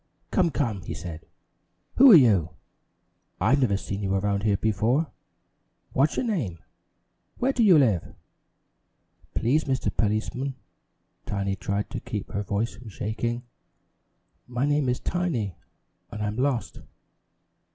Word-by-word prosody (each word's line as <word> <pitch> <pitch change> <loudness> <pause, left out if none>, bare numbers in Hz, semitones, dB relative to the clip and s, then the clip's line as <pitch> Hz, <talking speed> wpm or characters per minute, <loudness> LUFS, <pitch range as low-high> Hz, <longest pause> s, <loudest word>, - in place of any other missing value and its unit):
"Come, 180 -3 +3
come!" 115 -11 -1
he 90 - -6
said. 85 -4 -8 0.7
"Who 270 0 +9
are - - +11
you? 105 - +4 0.8
I've 135 +5 +3
never 100 -6 +2
seen 100 +1 -5
you 95 -1 0
around 100 +1 0
here 105 -1 +2
before! 110 +9 +1 0.8
What's 140 +4 +2
your - - 0
name? 140 - -2 0.8
Where 265 +2 +1
do 250 - 0
you 195 -7 +7
live?" 110 - +2 1.2
"Please, 140 +7 +2
Mr. 130 -2 -1
Policeman" 110 +5 -1 0.7
Tiny 100 -1 -1
tried 100 +3 -3
to - - -3
keep 105 -3 -6
her 100 - -2
voice 105 +3 -2
from 115 +1 -11
shaking 115 +4 -3 1.0
"my 125 +2 -1
name 145 -2 +1
is 125 - 0
Tiny 135 - -2 0.5
and 105 0 -5
I'm 105 0 -2
lost." 130 -2 -1
115 Hz, 130 wpm, -26 LUFS, 100-140 Hz, 1.2 s, are